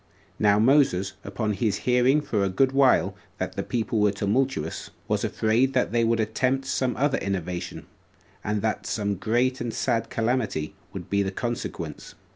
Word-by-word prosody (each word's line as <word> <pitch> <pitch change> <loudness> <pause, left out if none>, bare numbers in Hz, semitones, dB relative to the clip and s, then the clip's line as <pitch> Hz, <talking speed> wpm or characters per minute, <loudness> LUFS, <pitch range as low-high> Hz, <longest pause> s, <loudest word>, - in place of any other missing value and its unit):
2. - - -3
Now 100 0 +5
Moses, 110 -6 +3
upon 105 +2 -2
his 105 -1 0
hearing 125 +4 +4
for 105 -8 -1
a 95 - +1
good 130 +8 +2
while 130 -8 +3 0.2
that - - -3
the - - -1
people 115 -2 -1
were 105 -1 +4
tumultuous, 125 +7 -1 0.2
was - - 0
afraid 115 +5 +1
that 125 - +1
they 115 0 +2
would 115 0 +2
attempt 130 +5 0
some 130 -1 -1
other 140 +1 +1
innovation, 90 -2 -4 0.6
and 105 0 -1
that 110 -1 -1
some 100 -2 -1
great 120 +7 0
and 120 -1 -2
sad 115 -1 -1
calamity 110 -9 -1 0.2
would - - -7
be 100 0 +1
the 95 - 0
consequence. 120 +4 -5
115 Hz, 170 wpm, -25 LUFS, 100-130 Hz, 0.6 s, Now